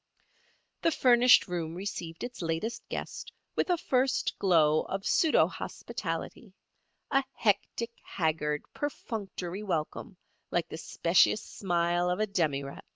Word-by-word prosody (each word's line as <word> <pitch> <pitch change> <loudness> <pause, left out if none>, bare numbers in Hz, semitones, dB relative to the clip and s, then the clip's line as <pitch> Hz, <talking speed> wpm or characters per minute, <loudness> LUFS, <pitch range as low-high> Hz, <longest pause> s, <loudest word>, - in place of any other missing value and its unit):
The - - +4
furnished 250 -5 +6
room 170 -2 -3
received 175 -3 -5
its 245 -3 -6
latest 165 +8 -3
guest - - -5 0.2
with - - 0
a 355 - +3
first 260 -3 +1
glow 155 -5 +4
of 195 0 -4
pseudo 320 - +4
hospitality, - - -5 0.6
a 275 0 +3
hectic, 230 +2 0
haggard, 155 -3 -1
perfunctory 205 -9 -4
welcome 180 0 -3 0.3
like 170 -1 -1
the - - -6
specious 175 +6 +3
smile 175 -1 0
of 180 +2 0
a 215 - +3
demirep. 145 -8 -1
180 Hz, 120 wpm, -30 LUFS, 165-225 Hz, 0.6 s, furnished